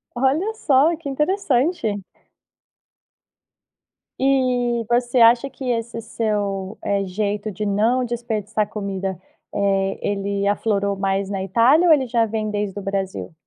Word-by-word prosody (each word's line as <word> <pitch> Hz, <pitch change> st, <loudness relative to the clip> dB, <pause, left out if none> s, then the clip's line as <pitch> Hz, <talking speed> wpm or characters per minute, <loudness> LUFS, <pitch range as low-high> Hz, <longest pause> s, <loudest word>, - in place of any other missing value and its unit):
Olha 285 Hz, -, +1 dB
só, 300 Hz, -2 st, +3 dB
que 310 Hz, -3 st, -7 dB
interessante! 275 Hz, -, 0 dB, 2.2 s
E 250 Hz, -3 st, +1 dB
você 240 Hz, +1 st, +2 dB
acha 235 Hz, +4 st, +5 dB
que 260 Hz, -2 st, -4 dB
esse 230 Hz, 0 st, -3 dB
seu, 205 Hz, -3 st, -2 dB
eh, 200 Hz, -1 st, 0 dB
jeito 205 Hz, +3 st, -2 dB
de 210 Hz, +2 st, -4 dB
não 225 Hz, +5 st, +2 dB
desperdiçar 220 Hz, -3 st, -2 dB
comida, 195 Hz, -3 st, -4 dB, 0.3 s
eh, 195 Hz, -1 st, 0 dB
ele 200 Hz, 0 st, -1 dB
aflorou 200 Hz, -1 st, 0 dB
mais 195 Hz, 0 st, -1 dB
na 195 Hz, -1 st, -3 dB
Itália 240 Hz, -, +4 dB
ou 330 Hz, -, +8 dB
ele 275 Hz, -4 st, +2 dB
já 235 Hz, -2 st, +1 dB
vem 215 Hz, 0 st, -2 dB
desde 205 Hz, -1 st, -3 dB
o -, -, -8 dB
Brasil? 195 Hz, -3 st, -3 dB
220 Hz, 130 wpm, -21 LUFS, 200-250 Hz, 2.2 s, ou